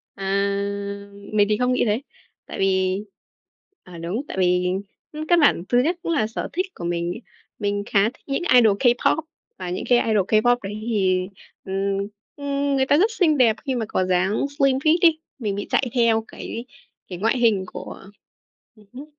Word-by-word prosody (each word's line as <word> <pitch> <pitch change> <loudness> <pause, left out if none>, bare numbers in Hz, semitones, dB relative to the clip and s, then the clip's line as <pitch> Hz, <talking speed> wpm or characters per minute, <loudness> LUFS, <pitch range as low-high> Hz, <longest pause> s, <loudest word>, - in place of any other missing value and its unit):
À! 195 - -8 1.1
Mình 205 -1 +4
thì 210 - +2
không 250 +1 +1
nghĩ - - +2
thế. 215 +2 0 0.4
Tại - - -8
vì 190 0 +1 0.8
à, 180 -2 -12
đúng, 170 +8 -3
tại - - -7
vì 180 0 +2 0.6
căn 345 -1 +5
bản 285 - +4
thứ 245 - +4
nhất 340 +5 0
cũng - - -2
là 285 -10 +1
sở 225 - -5
thích 370 +2 0
của 170 - -6
mình 170 0 -1
ấy. 230 - -9 0.4
Mình 205 -1 -1
khá 200 -2 +3
thích 225 - -3
những 275 +4 -1
idol 220 -5 +6
K-pop 245 +5 +3 0.4
và 185 -1 -5
những 180 - -3
cái 245 -1 +6
idol 210 -4 +2
K-pop 240 +3 +4
đấy 195 +1 -5
thì, 185 -4 +1 0.4
ừm, 195 +1 -1 0.4
ừm, 280 0 -1
người 265 -1 +2
ta 285 - +4
rất 415 +7 +3
xinh 320 -9 +2
đẹp 230 -4 +4
khi 265 -2 -1
mà 230 -2 -1
có 185 - 0
dáng 185 +7 +1
slim 275 -1 +4
fit 310 +4 +3
ấy, 330 -2 +5 0.2
mình 210 -5 -2
bị 200 - -5
chạy 260 - +1
theo 230 -3 +2
cái 230 +2 -7 0.4
cái 180 - -7
ngoại 225 +5 +1
hình 225 -5 +3
của - - -8 0.8
ừm 215 -1 -20
hứm. 270 +4 -8
220 Hz, 190 wpm, -23 LUFS, 195-265 Hz, 1.1 s, idol